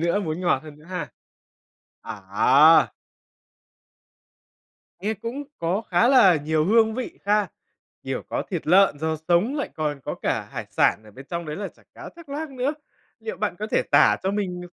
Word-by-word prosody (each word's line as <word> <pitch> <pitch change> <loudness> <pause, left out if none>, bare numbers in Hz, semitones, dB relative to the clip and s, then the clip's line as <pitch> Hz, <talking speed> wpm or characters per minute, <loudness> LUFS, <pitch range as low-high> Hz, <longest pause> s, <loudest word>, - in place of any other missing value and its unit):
nữa, 170 +5 +1
muốn 165 -2 -3
ngọt 170 -6 +1
hơn 150 -1 -12
nữa 150 - -18
ha. 180 -1 -5 0.9
À! 125 +11 +4 2.1
Nghe 210 +4 -1
cũng 230 +7 -6 0.2
có 175 +6 -1
khá 180 +7 +4
là 200 -10 +6
nhiều 155 +1 0
hương 220 +3 +3
vị 255 +1 -6
ha? 210 0 +2 0.5
Kiểu, - - -4
có - - -2
thịt 175 -5 -4
lợn, 185 -2 +4
rau 160 +1 -1
sống, 205 - +2
lại 285 - -3
còn 150 -3 -3
có - - -3
cả - - -1
hải - - -5
sản 110 - +2
ở 105 - -15
bên 135 +6 -13
trong 170 -1 -3
đấy 150 - -5
là 200 0 -4
chả - - -24
cá - - -9
thác 335 -3 -14
lác 295 +2 -5
nữa. 265 +3 -2 0.5
Liệu 450 - -6
bạn - - -2
có - - -3
thể - - +2
tả - - +5
cho 190 - 0
mình 195 -3 -3
180 Hz, 185 wpm, -24 LUFS, 155-220 Hz, 2.1 s, là